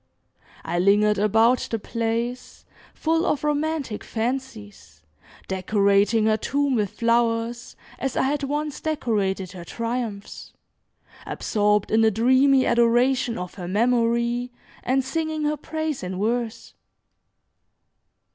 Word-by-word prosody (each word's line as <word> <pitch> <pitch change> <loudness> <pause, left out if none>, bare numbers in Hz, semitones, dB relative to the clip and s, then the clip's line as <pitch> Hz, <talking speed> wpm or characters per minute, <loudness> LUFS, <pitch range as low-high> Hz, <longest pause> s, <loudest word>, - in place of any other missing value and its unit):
I 175 +1 -1
lingered 205 +2 +3
about 225 +4 +3
the 225 - -1
place, 230 +3 -4 0.3
full 325 +1 +1
of 300 -6 0
romantic 300 -5 -1
fancies, 220 - -5 0.4
decorating 200 +3 +2
her 215 0 +3
tomb 280 +4 0
with 210 -5 +1
flowers, 230 +1 0 0.2
as 270 - -3
I - - +2
had 285 +2 0
once 295 +1 -3
decorated 205 - -1
her 180 -2 -9
triumphs, 230 0 -5 0.7
absorbed 210 -2 0
in 220 +1 +4
a 220 - +5
dreamy 260 +5 +4
adoration 240 +1 +2
of 180 0 -6
her 180 -3 -7
memory, 235 +3 +1 0.3
and 260 +1 +1
singing 315 +3 -2
her 300 0 +1
praise 315 0 -4
in 185 0 -5
verse. 230 +1 -2
235 Hz, 115 wpm, -24 LUFS, 210-265 Hz, 0.7 s, a